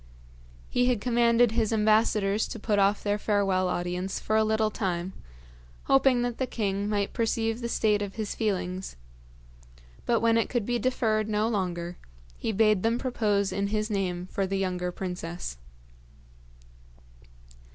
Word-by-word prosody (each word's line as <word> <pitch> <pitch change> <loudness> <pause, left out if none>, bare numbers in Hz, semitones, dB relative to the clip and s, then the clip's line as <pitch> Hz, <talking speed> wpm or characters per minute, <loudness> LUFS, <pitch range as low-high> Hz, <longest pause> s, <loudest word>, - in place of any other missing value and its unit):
He 245 0 +1
had 250 -3 +2
commanded 235 0 +3
his 225 -1 0
ambassadors 215 -1 +2
to - - -6
put 210 -1 0
off 200 +1 +2
their 205 0 0
farewell 195 -3 +1
audience 180 +2 -2
for 215 - -1
a 220 - +4
little 220 0 +1
time, 185 -2 -2 0.7
hoping 270 -2 +4
that 245 -1 -3
the 260 - 0
king 200 -3 -2
might 205 -1 -1
perceive 225 0 -1
the 235 - -3
state 210 -3 +2
of 200 -1 -4
his 215 -2 -3
feelings; 190 -4 -2 1.1
but 235 -1 +3
when 230 0 +3
it 225 - -1
could 240 -5 -1
be 240 +1 0
deferred 220 -3 0
no 215 +1 +1
longer, 180 -5 -2 0.4
he - - -2
bade 215 -2 +3
them 230 +3 +1
propose 210 -6 0
in 200 0 -1
his 215 +1 -1
name 180 -3 -1
for 195 -1 -1
the 195 +1 -1
younger 180 -2 -1
princess. 175 - -5
210 Hz, 150 wpm, -27 LUFS, 195-225 Hz, 1.1 s, a